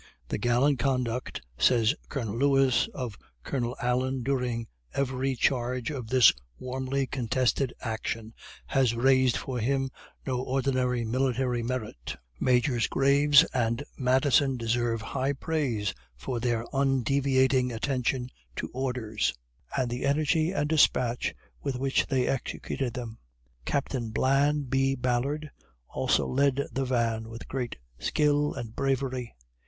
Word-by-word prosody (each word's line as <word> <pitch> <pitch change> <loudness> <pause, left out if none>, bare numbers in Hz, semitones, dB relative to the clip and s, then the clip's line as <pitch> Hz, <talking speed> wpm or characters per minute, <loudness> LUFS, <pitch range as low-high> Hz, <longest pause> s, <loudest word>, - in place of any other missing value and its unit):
"The - - -2
gallant 125 +4 +2
conduct," 125 -1 -1 0.2
says 115 -1 +4 0.2
Colonel 115 -7 -3
Lewis, 135 -1 +3
"of 125 -7 -5 0.2
Colonel 125 -2 -2
Allen 125 +1 0
during 125 -3 -1 0.3
every 135 0 0
charge 125 +1 0
of 130 -6 -5
this 125 -2 +6 0.2
warmly 130 +1 -2
contested 130 +1 0
action, 110 0 -4 0.3
has 130 -4 +2
raised 130 +1 +4
for 130 -2 -4
him 135 +3 0 0.3
no 125 -2 -1
ordinary 130 -2 0
military 125 0 0
merit. 115 - -4 0.2
Majors 125 -1 +2
Graves 140 +1 +5
and 115 +1 0
Madison 130 +1 +3
deserve 115 -1 0
high 135 +4 -1
praise 130 -9 -1 0.2
for 115 - -4
their 120 -1 0
undeviating 135 -1 +2
attention 125 +1 -1 0.2
to - - -4
orders, 120 - -1 0.4
and 125 -2 0
the 120 - -3
energy 155 +3 +2
and 150 -6 0
despatch 125 -6 +2 0.3
with 135 - -2
which 135 +2 +1
they 130 -3 +1
executed 130 -1 -3
them. 115 -2 -6 0.5
Captain 130 -4 -1
Blan 140 +5 +2
B. 135 +1 +1
Ballard 135 +5 -1 0.4
also - - +1
led 140 +1 +1
the 135 0 -1
van 115 -3 0
with 115 +1 -9
great 125 -3 -3 0.2
skill 145 - +1
and 115 -1 -6
bravery." 130 - -1
130 Hz, 125 wpm, -28 LUFS, 120-135 Hz, 0.5 s, this